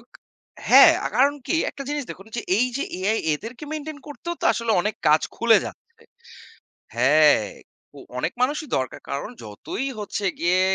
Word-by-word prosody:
উক - - -29 0.6
হ্যাঁ, - - +9
আ - - -1
কারণ 280 +2 +4
কি? 335 - +1
একটা 275 - -8
জিনিস 295 -1 -2
দেখুন 195 - -10 0.3
এই 245 - +3
যে 295 - -1
AI 210 +4 0 0.2
এদেরকে 235 - -8
মেইনটেইন 310 -1 -6
করতেও 295 +5 -6
তো - - -4
আসলে 230 -1 -1
অনেক 210 +4 -2
কাজ 155 +1 +4
খুলে 230 -2 +5
যাচ্ছে। - - -13 0.9
হ্যাঁ, 145 -1 +4 0.5
উ - - -10 0.2
অনেক - - -2
মানুষই 295 +4 0
দরকার। 130 -1 -4
কারণ 140 +8 -3
যতই 110 - -5
হচ্ছে 205 0 -4
গিয়ে 180 +2 +2
225 Hz, 160 wpm, -23 LUFS, -, 0.9 s, হ্যাঁ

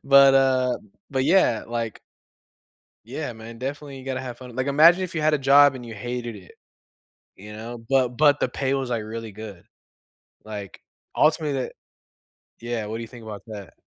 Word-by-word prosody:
but, 140 0 +7
uh, 130 -2 +3 0.3
but 130 -2 0
yeah, 155 - +4
like 115 -2 -3 1.1
Yeah, 130 +3 -5
man, 115 +1 -10
definitely 140 +2 -5
you 130 - -12
gotta 130 -1 -2
have 125 -2 -7
fun 125 -2 -11
like, 130 +2 -1
imagine 165 +6 +6
if 175 - -6
you 155 - -1
had 155 0 +3
a - - +3
job 140 0 +6
and 125 -2 -8
you 115 - -8
hated 120 +2 -5
it, 95 -3 -13 0.8
you 105 +2 -11
know, 115 +3 -7
but 130 -2 +3
but 145 -1 +5
the 125 - +1
pay 135 +1 -1
was, 135 -2 -1
like, 115 -3 -1
really 110 0 -6
good, 100 -4 -10 0.8
like, 105 -3 -8 0.4
ultimately 150 -3 +2
that - - -6 0.9
Yeah, 120 -2 -3
what 110 - -4
do - - -6
you 115 - -6
think 120 0 -12
about 105 -2 -8
that? 105 -4 -9
125 Hz, 185 wpm, -24 LUFS, 115-140 Hz, 1.1 s, but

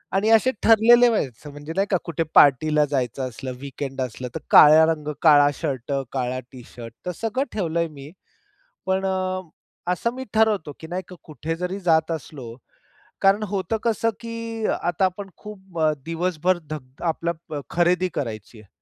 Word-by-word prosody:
आणि 205 +3 +2
असे 225 +3 +5
ठरलेले 235 +2 +6
व्हायचं 145 - -3
म्हणजे 145 +2 -8
नाही 195 +1 +1
का 190 - +4
कुठे 165 -1 -1
पार्टीला 150 +2 +5
जायचं 130 -2 -2
असलं, 130 +2 -7
वीकेंड 135 0 -6
असलं, 125 0 -4
तर - - -2
काळ्या 155 +1 +8
रंग, 160 -2 -2
काळा 145 -3 +6
शर्ट, 135 -4 -4 0.2
काळा 130 -1 -2
टी-शर्ट 120 -2 -11
तर 180 - -2
सगळं 240 - -2
ठेवलंय 170 -4 -1
मी. 140 0 -11 0.7
पण 190 +1 0
अ, 185 -1 -1 0.5
असं 235 +6 -2
मी 260 - -5
ठरवतो 215 -9 +2
की 160 - -9
नाही 180 +3 -4
का, 180 - -11
कुठे 155 +1 -5
जरी 180 +3 -4
जात 160 -3 +2
असलो 135 -7 -7 0.7
कारण 195 +2 +4
होतं 195 +2 -2
कसं 230 0 +1
की 230 -1 -4
आता 175 +2 0
आपण 195 +2 -2
खूप 190 -4 -11
अ, 155 -1 +3
दिवसभर 175 +1 0
धक 135 -4 -8
आपल्याला 165 -2 -3
खरेदी 180 +1 +2
करायची 110 -3 -5
आहे, 105 - -19
165 Hz, 160 wpm, -23 LUFS, 145-195 Hz, 0.7 s, काळ्या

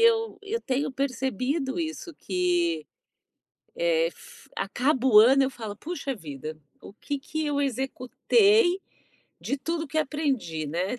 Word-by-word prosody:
eu 455 -1 +3
eu 425 +3 -2
tenho 270 - -1
percebido 265 - -1
isso, 325 0 -4
que, 175 - 0 0.9
eh, - - +2
f - - -13
acaba 265 0 +1
o 220 -5 +7
ano 260 +5 +6
eu 265 - +1
falo: 220 -6 -7
"Poxa 280 - -4
vida, 155 - -7 0.3
o - - -11
que 285 +7 -4
que 315 +3 -3
eu 285 -1 0
executei 350 - +2 0.6
de 280 - -2
tudo 325 +2 -3
que 315 +3 -1
aprendi?" 275 - -1
Né. 180 +10 -2
270 Hz, 135 wpm, -26 LUFS, 215-320 Hz, 0.9 s, o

